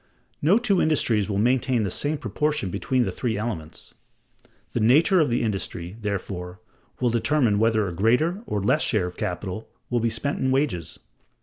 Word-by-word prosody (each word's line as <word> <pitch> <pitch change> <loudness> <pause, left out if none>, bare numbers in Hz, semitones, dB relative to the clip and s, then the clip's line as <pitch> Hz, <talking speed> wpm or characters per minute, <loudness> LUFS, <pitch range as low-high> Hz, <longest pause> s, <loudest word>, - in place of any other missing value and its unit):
No 170 +8 +5
two 210 -6 +2
industries 115 -10 +1
will 100 - -1
maintain 125 +1 +2
the 100 - -2
same 150 - -1
proportion 140 -2 -1
between 125 +6 0
the 95 - -2
three 110 +3 -2
elements. 95 -8 -6 0.8
The - - 0
nature 155 - +5
of 155 - +3
the 120 0 0
industry, 95 -4 -3
therefore, 95 -3 -4 0.4
will 125 -2 +1
determine 115 -2 +2
whether 110 -2 +2
a 90 - -4
greater 125 - +2
or 105 - -1
a - - -4
less - - +3
share 105 -5 +1
of 90 - -6
capital 90 +4 -4 0.2
will 120 - +2
be 115 0 +1
spent 115 +6 -2
in 130 - +1
wages. 130 - -1
115 Hz, 180 wpm, -24 LUFS, 100-135 Hz, 0.8 s, No